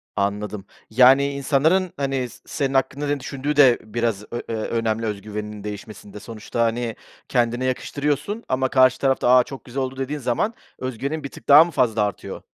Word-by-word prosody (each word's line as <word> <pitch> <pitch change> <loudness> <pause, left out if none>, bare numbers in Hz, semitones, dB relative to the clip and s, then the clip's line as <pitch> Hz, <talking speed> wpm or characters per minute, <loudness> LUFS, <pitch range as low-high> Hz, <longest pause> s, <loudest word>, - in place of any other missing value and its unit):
Anladım, 100 0 -2 0.2
yani 130 +4 +5
insanların 155 +7 +1
hani 135 -3 -1
s 130 - -15
senin 140 -3 -2
hakkında 140 +2 0
ne 145 0 0
düşündüğü 140 +2 -3
de 135 -4 +6
biraz 110 -1 -2
ö 120 - -3
eee, 115 - -2
önemli 115 0 -1
öz 105 -2 -3
güveninin 105 0 -6
değişmesinde. 105 0 -8
Sonuçta 115 +2 -5
hani 115 0 -1 0.3
kendine 120 0 +1
yakıştırıyorsun 145 - -2
ama 130 0 +1
karşı 130 -1 +4
taraf 135 -1 +1
da 125 - +3
"A, 125 - +6
çok 135 +1 -10
güzel 135 +2 -4
oldu." 130 0 -5
dediği 140 +3 -3
zaman 130 - -1 0.3
öz 130 -3 -4
güvenin 150 +4 -3
bir 140 - -5
tık - - -14
daha 145 +3 +10
mı 170 - -6
fazla 120 -6 +1
artıyor? 100 -1 -5
130 Hz, 185 wpm, -22 LUFS, 110-140 Hz, 0.3 s, daha